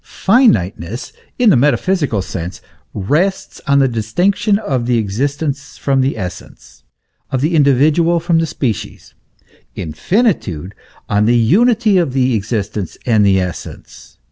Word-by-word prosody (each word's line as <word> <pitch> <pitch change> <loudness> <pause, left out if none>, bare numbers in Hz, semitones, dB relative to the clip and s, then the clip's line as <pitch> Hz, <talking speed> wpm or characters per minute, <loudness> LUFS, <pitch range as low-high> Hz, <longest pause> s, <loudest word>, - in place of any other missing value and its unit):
Finiteness 115 - 0 0.2
in 240 -4 +4
the - - +5
metaphysical 145 - +1
sense 90 0 -6 0.3
rests 155 - -1
on 140 0 +3
the 135 -1 +4
distinction 175 - 0
of 130 - -2
the 120 -1 +2
existence 135 +6 -3
from 135 -1 +1
the 130 -2 -1
essence, 90 -4 -9 0.5
of 130 - -1
the 155 +6 0
individual 155 +4 +3
from 170 0 +1
the 165 - 0
species; 125 -7 -4 0.6
infinitude, 95 - -1 0.3
on 105 +1 +1
the 120 +1 +4
unity 215 - +3
of 140 -7 -1
existence 110 -6 -2
and 110 -4 +3
essence. 95 -3 -4
135 Hz, 120 wpm, -16 LUFS, 105-170 Hz, 0.6 s, the